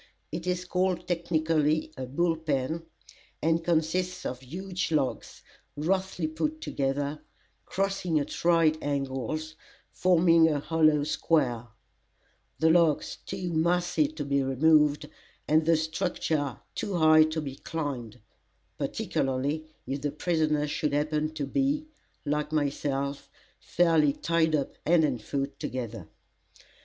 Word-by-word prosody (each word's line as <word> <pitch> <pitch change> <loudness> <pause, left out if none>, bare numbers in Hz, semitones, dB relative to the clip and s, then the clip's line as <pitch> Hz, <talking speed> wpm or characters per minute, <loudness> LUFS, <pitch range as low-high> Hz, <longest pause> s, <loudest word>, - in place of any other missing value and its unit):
It 170 +3 -5
is 180 0 -1
called 180 -1 0
technically 160 -3 +1
a 130 -1 -5
"bull 165 +5 +1
pen," 160 +1 -2 0.5
and 165 +1 +1
consists 175 +2 0
of 125 - -3
huge 180 +7 -4
logs, 145 -5 -2 0.3
roughly 185 +3 -1
put 300 - -2
together, 140 - -2 0.5
crossing 195 -4 0
at 145 - -5
right 165 -2 +4
angles, 140 +2 -3 0.4
forming 170 -2 +4
a 150 -2 0
hollow 155 -1 +3
square, 125 -6 0 0.9
the 160 0 +4
logs 165 -3 +2
too 185 -3 -4
massy 175 - +2
to 310 - -6
be 140 0 +1
removed, 150 +2 +3 0.4
and 155 +1 +3
the 165 -1 +5
structure 160 -4 -1 0.2
too 200 - -3
high 155 -1 +6
to 155 +1 -2
be 135 -3 -6
climbed, 140 -9 -5 0.6
particularly 140 +4 -1 0.2
if 135 +2 -3
the 145 - -1
prisoner 155 -1 0
should 150 0 -1
happen 150 +1 0
to 145 -2 -2
be, 280 - 0 0.4
like 150 +1 -1
myself, 140 -2 -1 0.3
fairly 165 -4 +3
tied 160 0 +1
up 140 -2 -3
hand 165 0 +4
and 130 -6 0
foot 140 +4 -3
together. 115 -8 -5
155 Hz, 125 wpm, -28 LUFS, 145-170 Hz, 0.9 s, high